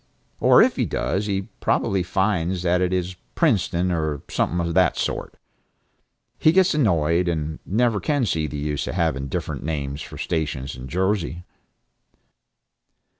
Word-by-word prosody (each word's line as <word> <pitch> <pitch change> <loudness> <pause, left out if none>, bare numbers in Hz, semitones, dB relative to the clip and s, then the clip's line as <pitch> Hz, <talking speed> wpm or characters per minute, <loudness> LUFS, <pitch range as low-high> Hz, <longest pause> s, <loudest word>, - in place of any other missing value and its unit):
Or - - +7
if - - +1
he - - +1
does, 100 +2 -1
he 100 -1 -1 0.2
probably 95 -1 +1
finds 90 -1 0
that 90 0 +2
it 90 0 +1
is 90 0 -1 0.2
Princeton 95 - +1
or 80 -4 -2
something 85 - 0
of 85 -1 -1
that - - +3
sort. - - -3 1.0
He 155 - +5
gets 190 +1 +4
annoyed, 85 - +2
and 80 -2 -2
never 110 +1 +2
can 145 -1 0
see 80 -6 0
the 75 - -6
use 75 0 -2
of - - -4
having 80 -6 0
different - - -4
names 70 -2 -3
for 80 -1 -9
stations 75 -5 -3
in 65 +1 -8
Jersey. 90 +1 -1
85 Hz, 150 wpm, -23 LUFS, 80-95 Hz, 1.0 s, Or